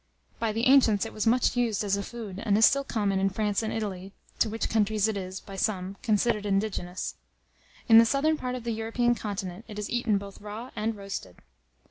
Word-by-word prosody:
By 225 -1 0
the 225 +3 -1
ancients 245 -7 +5
it 225 - -7
was 215 0 -2
much 245 +2 +3
used 235 -4 +1
as 200 -1 +1
a 200 - -2
food, 205 -3 -7
and 205 -2 +2
is 225 - +7
still 275 +1 +3
common 205 -7 0
in 195 0 +2
France 205 +1 0
and 220 - -2
Italy, 195 -3 -4 0.3
to 225 - +3
which 225 +1 -2
countries 215 -1 +2
it 220 - -1
is, 190 -1 -5
by 195 - -10
some, 195 -1 -1
considered 215 -1 +1
indigenous. 195 -3 -2 0.7
In 225 -2 +9
the 230 - +7
southern 295 +5 +2
part 250 -4 -4
of 250 - -6
the 235 - -2
European 230 +2 +1
continent, 200 -3 -5
it 210 -2 -9
is 210 - -4
eaten 240 -4 +1
both 200 0 -9
raw 215 +4 -7
and 220 +1 -1
roasted. 195 - -7
215 Hz, 210 wpm, -27 LUFS, 200-230 Hz, 0.7 s, In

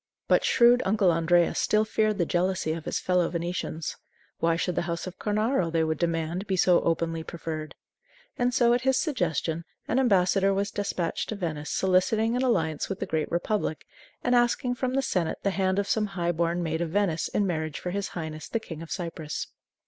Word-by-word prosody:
But - - +4
shrewd 245 0 +5
Uncle 195 -2 +3
Andrea 170 +1 +3
still 215 0 +2
feared 215 -1 +1
the 175 - +1
jealousy 180 -1 0
of 160 -1 -6
his - - -1
fellow 180 -2 +1
Venetians. 170 -2 -3 0.4
Why 165 0 +2
should 180 +1 -1
the - - 0
house 170 0 -3
of 185 -1 -8
Cornaro, 215 -3 0
they 165 -1 +2
would 160 -1 -1
demand, 170 +3 -1
be 190 - +1
so 180 -1 +4
openly 165 0 0
preferred? 160 -2 -6 0.6
And 245 0 +1
so, 240 -1 +4
at 245 - +1
his 265 0 +2
suggestion, 170 - -1 0.2
an 250 - +1
ambassador 195 -4 +3
was 200 +1 -1
despatched 185 -5 -2
to 220 - -2
Venice 155 -6 -4
soliciting 215 +5 +2
an 250 - 0
alliance 165 - 0
with 195 - -4
the - - -2
Great 155 -1 -1
Republic, 175 -2 -1 0.4
and 245 - +2
asking 245 +1 +2
from 255 +1 -2
the 270 - +1
senate 175 -9 -1
the 200 - +2
hand 190 0 0
of 200 0 0
some 215 -1 +1
high 170 0 +1
born 170 +1 0
maid 160 0 -2
of 170 - -1
Venice 175 -3 0
in 205 - 0
marriage 155 -5 -2
for 180 - -4
his 200 +1 -2
highness, 155 -2 -6
the 230 - 0
King 165 -7 -8
of 165 - -9
Cyprus. 165 -4 -4
180 Hz, 200 wpm, -27 LUFS, 165-215 Hz, 0.6 s, shrewd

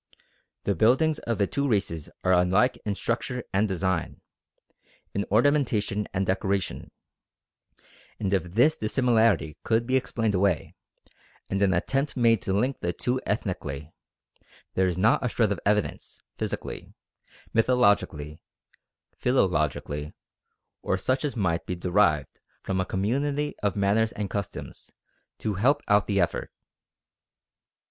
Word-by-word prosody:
The 100 - +1
buildings 130 - +3
of 115 -2 -2
the 100 - +2
two 140 +7 -1
races 95 -8 -1
are 95 - +3
unlike 95 +8 +3
in 105 -2 -1
structure 120 +3 -2
and 100 +3 +2
design, 95 -3 -2 0.9
in 100 - -1
ornamentation 110 -4 +2
and 95 +1 -1
decoration; 95 +1 -1 1.3
and 100 -2 -1
if 90 -1 -1
this 140 +7 +4
dissimilarity 110 - +2
could 115 +1 +1
be 130 +2 0
explained 115 -4 0
away, 95 -3 +1 0.8
and 95 +1 0
an 100 -2 +4
attempt 135 - -1
made 115 -3 +4
to - - -2
link 125 +8 0
the 85 0 -2
two 125 +7 -1
ethnically, 80 -8 -3 0.8
there 95 0 +2
is 90 -1 -2
not 110 +7 +3
a 125 - +1
shred 110 -2 +1
of 100 - -1
evidence, 105 0 -1 0.2
physically, - - -5 0.6
mythologically, 100 - +2 0.8
philologically, 75 - 0 0.7
or - - 0
such 130 +1 0
as 145 -3 -2
might 85 -7 -1
be 90 - -2
derived 85 -5 +1 0.2
from 95 -1 -1
a - - -1
community 140 +11 -1
of 100 -2 0
manners 105 +3 +2
and 105 -2 -4
customs, 100 -1 -6 0.5
to 105 - -2
help 135 +9 +2
out 105 0 +3
the 100 -2 +1
effort. 85 - -1
105 Hz, 130 wpm, -26 LUFS, 95-120 Hz, 1.3 s, this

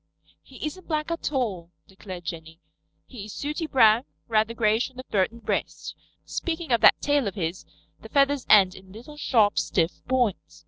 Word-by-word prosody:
"He - - -9
isn't 340 +5 -7
black 310 0 -2
at 335 -2 -3
all," 205 - -2 0.2
declared 190 -2 -10
Jenny. 160 -1 -7 0.5
"He 225 -6 -9
is 215 - -9
sooty 300 +3 -4
brown, 230 -4 +5 0.2
rather 220 0 +1
grayish 220 +2 +1
on 260 - -23
the 255 - -7
throat 190 -7 +1
and 235 0 -15
breast. - - -3 0.3
Speaking 330 -3 -4
of 235 - +3
that - - +6
tail 285 -5 +1
of 200 - -4
his, 175 -2 -4 0.3
the - - -11
feathers 280 -1 +2
end 195 -3 +6
in 190 0 -14
little, 245 +9 -12
sharp, 220 -8 +2
stiff 170 -1 -1
points. 250 -6 -1
230 Hz, 180 wpm, -25 LUFS, 190-280 Hz, 0.5 s, that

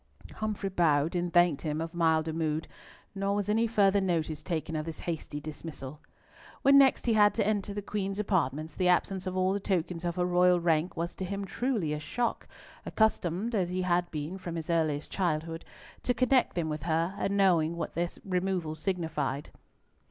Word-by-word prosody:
Humfrey 210 -2 -2
bowed, 165 -3 +2
and 175 0 -1
thanked 175 -4 +4
"him 155 -1 -2
of 165 +1 -4
milder 160 -2 +2
mood," 160 -1 -1 0.5
nor 195 0 -1
was 205 0 -1
any 225 +2 +3
further 200 -3 +3
notice 160 -4 -1
taken 160 -1 -3
of 155 - -1
this 160 0 -6
hasty 160 -3 -4
dismissal. 150 -2 -8 0.6
When 275 +1 +7
next 270 -1 +4
he 235 - +3
had 210 -1 +5
to - - +1
enter 205 -1 0
the 205 0 -4
Queen's 195 -1 -3
apartments, 160 -7 0
the 180 +2 0
absence 185 +1 +1
of 185 0 -3
all 185 +1 +2
the 200 - -1
tokens 180 -3 -1
of 170 -1 -2
her 180 - +1
royal 180 0 +4
rank 170 0 +1
was 170 +1 -2
to - - -6
him 200 +2 -3
truly 215 - -1
a 150 - -3
shock, 235 +11 -2 0.4
accustomed 220 0 0
as 185 -5 +1
he 185 +1 -1
had 175 -1 +1
been, 155 +5 -5
from 175 -2 -6
his 165 0 -3
earliest 155 -3 0
childhood, 165 -2 -1 0.4
to 245 - 0
connect 255 +1 +2
them 170 -3 -1
with 150 -1 -3
her, 165 +3 0
and 200 0 0
knowing 170 -4 +3
what 170 - -4
their 170 0 -1 0.2
removal 180 -4 -1
signified. 155 -6 -2
175 Hz, 190 wpm, -29 LUFS, 160-195 Hz, 0.6 s, When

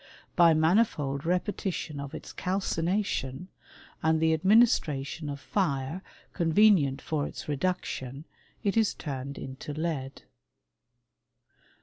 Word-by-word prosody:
By 170 -2 +6
manifold 155 -5 +2
repetition 180 -4 -2
of 140 -1 -6
its - - -9
calcination, 180 -4 -1 0.5
and 160 0 +2
the 160 0 +3
ad 160 - -2
ministration 165 - +3
of 140 0 -5
fire 140 +1 -1 0.3
convenient 165 -6 +4
for 150 -2 -1
its - - -8
reduction, 145 -3 -3 0.4
it 200 0 +1
is 225 -2 +2
turned 140 -2 -5
into 135 +2 -7
lead. 150 -4 -3
160 Hz, 105 wpm, -28 LUFS, 140-185 Hz, 0.5 s, By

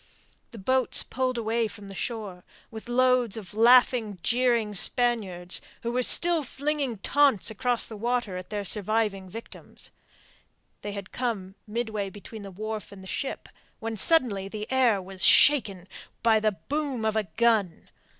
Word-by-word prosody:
The 230 - -11
boats 260 +5 +2
pulled 255 0 -2
away 230 0 -1
from 205 -1 -11
the 195 - -9
shore, 200 -4 -6 0.3
with 220 -1 -9
their 240 0 -5
loads 255 -4 +2
of 205 -2 -9
laughing, 230 -2 +4
jeering 235 -3 +1
Spaniards, 200 -5 +1 0.2
who 235 - -2
were 250 +1 0
still 335 +6 +4
flinging 280 -2 -3
taunts 265 -1 +2
across 240 +2 +1
the 225 - -8
water 235 -2 -2
at 185 0 -8
their 205 -1 -4
surviving 210 -1 0
victims. 230 +5 -11 0.9
They 205 - -6
had 200 -1 -8
come 215 -7 -4
midway 215 -2 -3
between 205 +3 -11
the 200 - -9
wharf 215 -1 -6
and 195 -1 -12
the - - -11
ship, 270 +7 -4 0.3
when 225 0 -4
suddenly 215 - +1
the 210 +1 -6
air 250 -6 +3
was 190 0 -8
shaken 200 -11 +6 0.4
by 225 -2 +4
the 215 -1 0
boom 270 - -4
of 220 0 0
a 215 -1 0
gun. 220 -7 +1
220 Hz, 160 wpm, -26 LUFS, 200-245 Hz, 0.9 s, shaken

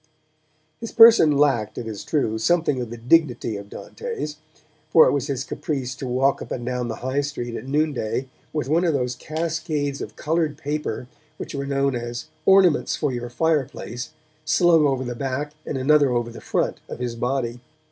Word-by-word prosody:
His 230 - -6
person 225 -11 +7
lacked, 135 -7 +2
it 120 - -4
is 110 -3 -6
true, 110 -8 0
something 150 0 +2
of 120 - -5
the 120 - -7
dignity 125 -2 +2
of 100 0 -8
Dante's, 455 - -6 0.5
for 160 0 +7
it - - +3
was 140 -2 -1
his 135 -2 -2
caprice 135 -3 -3
to 130 0 -6
walk 130 +2 +1
up - - -7
and 120 - -4
down 125 -1 -2
the 115 - -3
High 130 +2 +1
Street 130 -5 -4
at 130 - -7
noonday 135 -4 -1 0.2
with 150 -3 -2
one 165 +5 +2
of 165 -4 +2
those 125 -2 -1
cascades 155 -1 -3
of - - -7
coloured 155 -2 -1
paper 145 -5 -3 0.3
which - - -7
were 140 0 -3
known 140 0 +1
as 120 0 -4 0.2
'ornaments 190 -5 +5
for 150 -3 -1
your 120 -1 -4
fireplace' 135 -4 -1 0.3
slung 160 0 +4
over 135 -2 0
the 120 -1 -4
back 135 +4 -3 0.2
and 140 - -2
another 145 +1 +4
over 120 -1 -1
the 115 - -10
front - - -1
of - - -6
his 120 -1 -3
body. 125 0 -2
140 Hz, 185 wpm, -23 LUFS, 120-155 Hz, 0.5 s, person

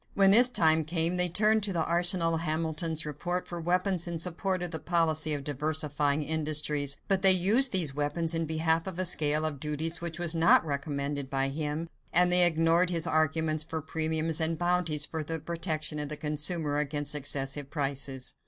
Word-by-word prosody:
When 195 -1 +4
this 245 +5 +8
time 160 -8 +2
came, 165 +2 0
they 180 0 +2
turned 215 +5 +1
to 200 -1 -1
the 165 -2 -1
arsenal 175 0 +3
of 165 - -2
Hamilton's 160 0 -1
report 175 +5 -4
for 175 -1 -7
weapons 180 +1 0
in 170 -1 -4
support 180 +2 -3
of 175 - -4
the 160 - -5
policy 160 -2 0
of 140 - -6
diversifying 150 0 -2
industries; 150 -2 0
but 195 -1 0
they 190 -1 +8
used 210 +9 +6
these 170 -8 +1
weapons 150 +3 -2
in 165 -1 -2
behalf 160 +2 -1
of 185 -3 -6
a 185 - -1
scale 155 -2 +1
of 150 -3 -4
duties 155 +3 -3
which 170 -1 -5
was 175 -1 -1
not 165 0 +3
recommended 140 -1 -4
by 135 -1 -1
him 150 +3 -4 0.2
and 180 +1 +4
they 180 -1 +7
ignored 165 +2 +1
his 170 -2 -1
arguments 155 -1 0
for 160 0 -6
premiums 160 +1 -3
and 160 0 -1
bounties 175 -4 0
for 160 0 -6
the 160 +2 -4
protection 160 -2 -3
of 150 -1 -2
the 150 - -2
consumer 150 0 -1
against 145 0 -2
excessive 140 -1 -3
prices. 140 -3 -4
160 Hz, 190 wpm, -28 LUFS, 150-175 Hz, 0.2 s, this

